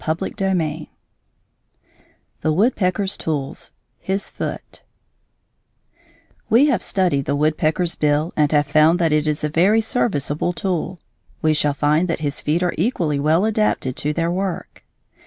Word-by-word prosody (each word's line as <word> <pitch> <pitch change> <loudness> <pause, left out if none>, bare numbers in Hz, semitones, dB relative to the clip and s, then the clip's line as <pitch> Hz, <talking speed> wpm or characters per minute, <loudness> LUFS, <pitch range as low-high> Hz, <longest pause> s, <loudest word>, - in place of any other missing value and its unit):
XII 170 0 -2 1.5
THE 155 - +1
WOODPECKER'S 195 0 +1
TOOLS: 145 -1 -4 0.3
HIS 195 +1 -3
FOOT - - -6 1.7
We 240 +6 +5
have 270 -9 +1
studied 175 -8 0
the 140 - 0
woodpecker's 155 +3 +1
bill 150 +3 0
and 150 -2 +2
have 145 -1 +3
found 155 +4 +4
that 165 -3 +1
it 150 0 +1
is 150 -1 -1
a - - +2
very 185 +8 +3
serviceable 175 - 0
tool. 180 -1 -3 0.4
We 155 0 +3
shall 150 -2 +1
find 150 +5 +2
that 165 -2 -2
his 145 -2 -2
feet 160 +4 0
are 175 - 0
equally 165 - 0
well 160 +7 +2
adapted 215 - 0
to 150 - -1
their 165 +2 -1
work. 185 0 -4
165 Hz, 140 wpm, -20 LUFS, 150-190 Hz, 1.7 s, We